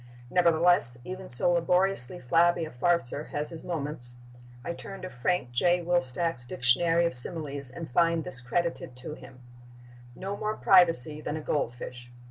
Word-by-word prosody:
Nevertheless, 170 -7 +4
even 185 +3 -8
so 125 +8 +1
laboriously 180 -2 +1
flabby 170 +5 +2
a 155 - -9
farceur 150 +1 0
has 150 +2 -4
his 165 - -9
moments. 145 -7 -4 0.5
I 170 - -3
turn 195 +2 -6
to 185 - -6
Frank 125 +1 -1
J. 175 +8 +2
Wilstach's 165 -4 -1
Dictionary 165 +8 +2
of 170 - -1
Similes 140 +1 +1
and 165 +6 -8
find 165 +4 +2
this 130 -2 -4
credited 165 +1 -2
to 125 +4 -2
him: 130 -4 -13 0.7
"No 195 +6 -5
more 215 +1 -3
privacy 165 -5 +4
than 155 - -4
a - - -5
goldfish." 120 -3 -4
165 Hz, 150 wpm, -28 LUFS, 125-175 Hz, 0.7 s, Nevertheless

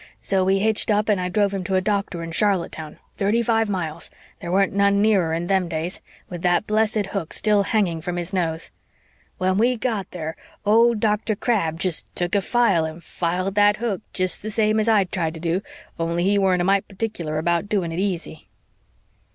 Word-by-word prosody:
So 190 -1 +1
we 190 +1 +3
hitched 220 +3 +1
up 210 0 +2
and 200 -3 +2
I 180 - -2
drove 200 +1 +1
him 195 -2 -2
to 190 - 0
a - - +4
doctor 195 -3 -1
in 165 - -6
Charlottetown, 170 -5 -1 0.2
thirty 210 +4 +1
five 225 -1 +1
miles 170 -4 -3 0.3
there 170 - -5
weren't 195 +1 +2
none 200 0 +3
nearer 200 -6 +3
in 165 +1 -1
them 190 -1 +1
days 165 +2 -4 0.3
with 175 -2 -7
that 175 +3 +2
blessed 215 -1 +1
hook 190 -6 -3
still 210 -2 +2
hanging 195 -6 0
from 175 +1 -4
his 175 +2 -4
nose. 165 -3 -2 0.7
When 185 +1 +1
we 245 +3 +3
got 215 -4 -2
there 160 -2 -5 0.3
old 230 +2 +4
Dr. 215 0 +1
Crabb 195 -8 0
jest 180 -3 -1
took 175 0 0
a 200 - +3
file 200 -5 +2
and 160 +2 -7
filed 180 +4 -2
that 205 +1 +4
hook 220 -4 -2
jest 185 -1 0
the 215 - -5
same 215 0 +1
as 215 +1 +1
I'd 200 -5 +3
tried 165 -3 -2
to - - -7
do, 170 +3 -1 0.4
only 170 +1 0
he 200 +2 +3
weren't 185 -2 +2
a - - 0
mite 195 +1 +2
particular 190 -7 -4
about 170 +4 0
doing 190 -6 0
it 165 - -3
easy!" 175 -5 -3
190 Hz, 200 wpm, -23 LUFS, 170-210 Hz, 0.7 s, a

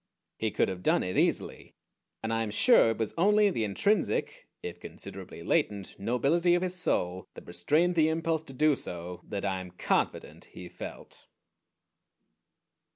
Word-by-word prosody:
He 110 - 0
could - - +1
have 95 -1 -5
done - - +2
it 90 0 -3
easily, - - -1 0.5
and 110 0 -1
I 115 - 0
am 110 - -2
sure 115 - +5
it 115 - -1
was 110 -2 -2
only 210 +2 +4
the 115 - -1
intrinsic, 205 - 0 0.2
if 445 - -6
considerably - - -9
latent, 105 - 0
nobility 145 - +2
of 175 - 0
his 185 -1 -2
soul 95 - -1
that - - -11
restrained 150 - +1
the 160 -2 +3
impulse 160 0 0
to 135 - -11
do 150 +2 +3
so 90 -4 -6
that 100 -1 -3
I 95 -1 -1
am 90 - -9
confident 90 - -2
he - - -11
felt. - - -10
125 Hz, 160 wpm, -29 LUFS, -, 0.5 s, sure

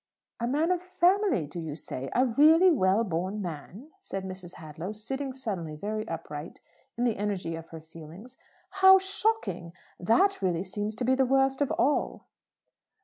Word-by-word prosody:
"A 235 - -1
man 305 +7 +1
of 360 -1 0
family, 365 - +2
do 150 +4 -8
you 160 -3 -5
say? 135 -3 -6
A 255 - +4
really 315 +9 +5
well 200 - +2
born 185 +1 -3
man?" 185 - -8
said 195 - -6
Mrs. 185 -1 -8
Hadlow, 160 +5 -7
sitting 265 +6 -4
suddenly 195 -12 -4
very 215 +6 -4
upright 155 -1 -7 0.4
in 240 - -1
the 235 -3 +1
energy 195 -5 -2
of 165 0 -9
her 160 -1 -9
feelings. 165 +9 -12 0.5
"How 380 0 +9
shocking! 385 - -1 0.3
That 355 - +2
really 180 -2 0
seems 205 +3 -3
to 245 - -3
be 260 - +3
the 260 0 +2
worst 270 +1 +2
of 285 - +2
all!" 290 +3 0
210 Hz, 165 wpm, -28 LUFS, 170-270 Hz, 0.5 s, How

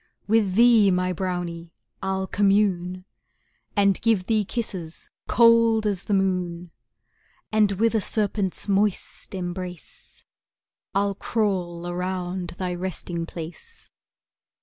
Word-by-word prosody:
With 205 -3 +2
thee, 230 -3 +6
my 180 0 +1
brownie, 175 -2 -4 0.3
I'll 190 0 -1
commune, 190 -3 +1 0.7
And 200 -2 +3
give 215 -5 +2
thee 215 0 +2
kisses 185 -7 -4 0.2
cold 230 -1 +5
as 200 -3 -1
the 205 - +1
moon, 180 -3 -1 0.8
And 215 -2 +3
with 225 +4 +2
a 220 - +2
serpent's 205 -2 -1
moist 200 0 -1
embrace, 180 -1 -7 0.7
I'll 200 0 +2
crawl 185 -5 -1
around 180 0 -3
thy 180 -1 -2
resting 175 -1 -4
place. 180 - -9
190 Hz, 105 wpm, -24 LUFS, 180-210 Hz, 0.8 s, thee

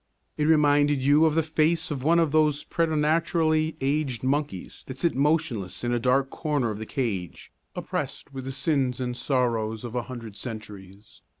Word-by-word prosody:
It 150 - 0
reminded 145 -2 +4
you 145 +3 +5
of 155 - 0
the 165 - +3
face 160 +2 +1
of 140 -3 -3
one 165 +5 +3
of 165 -3 +2
those 150 -1 +2
preternaturally 160 0 +1
aged 135 -3 -1
monkeys 135 -8 -2
that 130 - -7
sit 170 +3 +1
motionless 140 - 0
in 120 0 0
a 120 - +1
dark 130 +3 +2
corner 145 -7 -1
of 105 - -6
the 110 - -6
cage, 105 - -4 0.2
oppressed 140 - -4
with 130 -1 -6
the 135 - -4
sins 135 -2 0
and 125 -1 -2
sorrows 115 -5 -1
of 120 -2 -6
a 125 - 0
hundred 115 -5 -8
centuries. 105 -4 -9
140 Hz, 175 wpm, -26 LUFS, 120-155 Hz, 0.2 s, you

